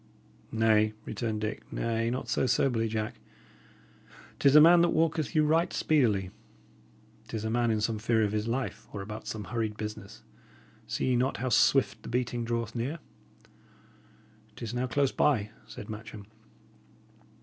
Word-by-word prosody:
"Nay," 110 -1 +3
returned 110 -3 -3
Dick 105 0 -5
"nay, 115 0 -1
not 125 +2 -3
so - - +1
soberly, 115 -4 +2
Jack. 110 0 -3 1.2
'Tis 140 +1 +4
a - - +11
man 170 +3 +8
that 175 - +4
walketh 160 0 0
you 155 -1 +4
right 165 +3 +2
speedily. 105 -11 +1 1.0
'Tis 110 -1 -4
a 110 - -1
man 120 0 +1
in 110 -1 +1
some 110 0 -1
fear 110 0 +2
of 105 - 0
his 105 +1 -1
life, 125 +3 -3
or 100 - -5
about 105 +2 -8
some 110 -1 -4
hurried 110 +1 -3
business. 105 0 -7 0.6
See - - -1
ye 125 - +3
not 130 +3 0
how 130 +2 -2
swift 120 - +3
the - - -9
beating 120 -1 -1
draweth 115 -1 -2
near?" 125 +7 -3 1.6
"It 120 - -10
is 115 0 -4
now 125 +1 -1
close 140 +2 +1
by," 110 -8 +1 0.2
said 105 - -9
Matcham. 105 -1 -8
115 Hz, 160 wpm, -29 LUFS, 110-130 Hz, 1.6 s, a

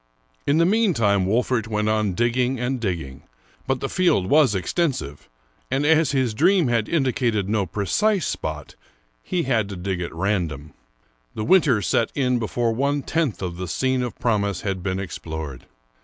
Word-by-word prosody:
In 145 - +3
the 170 - +4
meantime 135 - +2
Wolfert 115 +1 +1
went 105 -1 -1
on 110 -3 +1
digging 120 +3 +1
and 125 +1 -1
digging; 85 - -4 0.5
but 135 -1 0
the 135 - -1
field 175 - +2
was 145 -8 +5
extensive, 95 - -2 0.4
and 140 +2 0
as 160 -1 +4
his 130 -5 0
dream 170 - +3
had 115 -3 0
indicated 125 - 0
no 105 -2 0
precise 180 - 0
spot, 75 -2 -4 0.5
he 175 - -2
had 115 -6 0
to 100 - -6
dig 90 0 -3
at 85 - -4
random. 80 -5 -2 0.6
The 110 - -3
winter 150 - +4
set 110 +6 +1
in 125 -3 +1
before 115 +1 -1
one 140 +3 0
tenth 155 -11 -1
of 85 -2 -4
the 90 0 -4
scene 130 +8 0
of 125 -2 -4
promise 100 -5 0
had 95 -2 -3
been 95 0 -2
explored. 80 -7 -6
115 Hz, 165 wpm, -23 LUFS, 95-135 Hz, 0.6 s, was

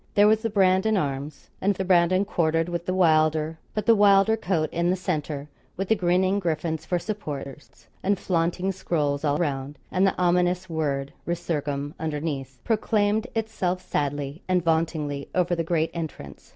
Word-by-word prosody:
There 205 - +6
were 215 - +6
the 225 +1 -3
Brandon 195 +1 +3
arms, 140 -2 -4
and 200 +1 +2
the 190 - -3
Brandon 185 +1 +3
quartered 165 -3 +1
with 170 0 -4
the 185 - 0
Wylder; 155 -2 +2 0.2
but 215 - -1
the 230 - +6
Wylder 205 0 +5
coat 180 -7 0
in 170 +1 +1
the 185 - +2
centre, 150 -5 -3 0.3
with 195 0 -3
the 220 - +5
grinning 185 +1 +2
griffins 160 -3 -2
for 180 - +1
supporters, 145 - -7 0.2
and 200 +1 +1
flaunting 180 +1 0
scrolls 150 -6 -1
all 145 -1 +2
round, 140 -3 -2
and 190 +2 +3
the 190 - -1
ominous 180 +1 +2
word 145 -4 -2
'resurgam' 150 -4 -2
underneath, 145 -4 -3
proclaimed 215 0 +1
itself 215 -5 -1
sadly 145 +1 -2
and 180 -2 +2
vauntingly 160 -4 -1
over 180 -1 +2
the 165 - -1
great 165 -1 0
entrance. 155 - -7
170 Hz, 165 wpm, -25 LUFS, 150-190 Hz, 0.3 s, There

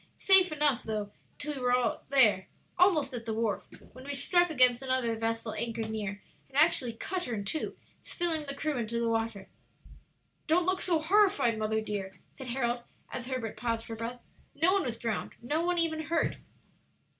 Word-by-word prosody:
Safely 370 -5 +6
enough, 290 -5 +2
though, 210 -2 -4 0.3
till 295 0 -4
we 270 - -6
were 250 -1 +1
there, 220 -9 +4 0.3
almost 340 -7 +3
at 235 -1 -6
the 220 - -1
wharf, 225 -2 -1 0.3
when 255 - -11
we 285 0 -4
struck 350 +6 +3
against 255 -5 +3
another 260 -3 0
vessel 225 0 -2
anchored 225 -1 -3
near, 210 -2 -4 0.3
and 270 - -7
actually 285 -6 +4
cut 360 +10 -4
her 240 - -3
in 200 -1 -4
two, 310 +10 -3 0.2
spilling 325 -4 -2
the 280 - -4
crew 305 -1 -2
into 235 0 -2
the 235 - 0
water." 225 -3 -2 1.0
"Don't 345 +3 +3
look 370 +1 0
so 340 -3 +2
horrified, 375 - +3
mother 220 0 0
dear," 195 -3 -5 0.2
said 265 - -9
Harold, 240 -1 -1 0.3
as 245 -1 -4
Herbert 255 -4 -3
paused 230 -1 -2
for 225 - -6
breath; 230 +2 -5 0.4
"no 325 +6 +3
one 395 -2 +2
was 235 -2 -3
drowned, 230 -2 -3
no 295 +7 -1
one 355 0 +1
even 330 -2 +1
hurt." 325 +2 0
250 Hz, 180 wpm, -30 LUFS, 225-315 Hz, 1.0 s, Safely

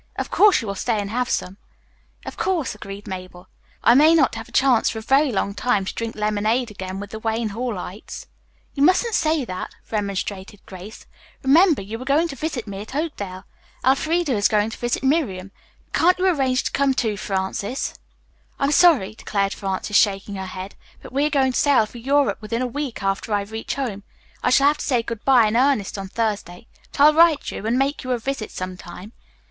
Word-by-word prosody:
Of - - -4
course, 410 -7 +5
you - - -6
will 200 - -2
stay 220 +3 -1
and 200 0 -4
have 250 +1 -1
some." 185 +2 -2 0.7
"Of - - -7
course," 355 -7 -1
agreed 200 -1 -9
Mabel. 185 -1 -8 0.4
"I 235 - +6
may 305 +5 +6
not 295 -5 +3
have 225 - -7
a - - -18
chance 260 -4 +3
for - - -5
a - - -4
very 275 +3 +3
long 200 -1 -1
time 205 -2 0
to - - -4
drink 230 -1 -4
lemonade 215 +3 0
again 190 -1 -6
with 205 0 -8
the 220 - -6
Wayne 225 0 -1
Hallites." 210 -3 -6 0.5
"You 275 - -4
mustn't 370 +9 +3
say 310 -7 +1
that," 185 -4 -6 0.2
remonstrated 200 -1 -4
Grace. 190 +3 -11 0.4
"Remember, 305 - +4
you 220 +4 -7
are - - -7
going 295 +5 +2
to 275 - -6
visit 300 -5 -4
me 200 -2 -6
at 220 +5 -9
Oakdale. 205 - -4 0.4
Elfreda 310 +4 +2
is 205 -2 +3
going 210 +1 +1
to - - -8
visit 240 +2 -1
Miriam. 225 - 0 0.4
Can't 360 +2 +4
you 365 - 0
can 370 -2 +3
arrange 260 -2 +1
to - - -2
come, 275 -1 +1
too, 220 -4 0
Frances?" 200 +4 -3 0.6
"I'm 275 +1 +1
sorry," 300 - +4
declared 200 -2 -2
Frances, 195 +1 -4
shaking 200 0 +1
her 190 -1 -5
head, 185 +1 -7 0.3
"but - - -11
we 285 +2 +2
are - - -2
going 270 -3 +2
to - - -1
sail 275 -6 +4
for 235 +3 -11
Europe 280 +3 +1
within 230 +3 -2
a - - 0
week 255 -3 -4
after 195 +3 -2
I 205 - +1
reach 220 +3 -5
home. 240 -8 -3 0.4
I - - +1
shall 275 - +4
have 300 - -2
to - - -4
say 245 -5 +1
good 230 -2 -6
bye 255 -4 +5
in 215 +1 0
earnest 255 -5 +2
on 195 - -5
Thursday. 210 -3 -3 0.3
But - - -10
I'll 300 +1 +8
write 325 -2 +4
you, 215 - -5
and 235 +2 +1
make 275 +2 0
you 255 - -6
a - - 0
visit 240 -1 -4
some 185 0 -6
time." 180 +5 -11
230 Hz, 210 wpm, -22 LUFS, 200-275 Hz, 0.7 s, I'll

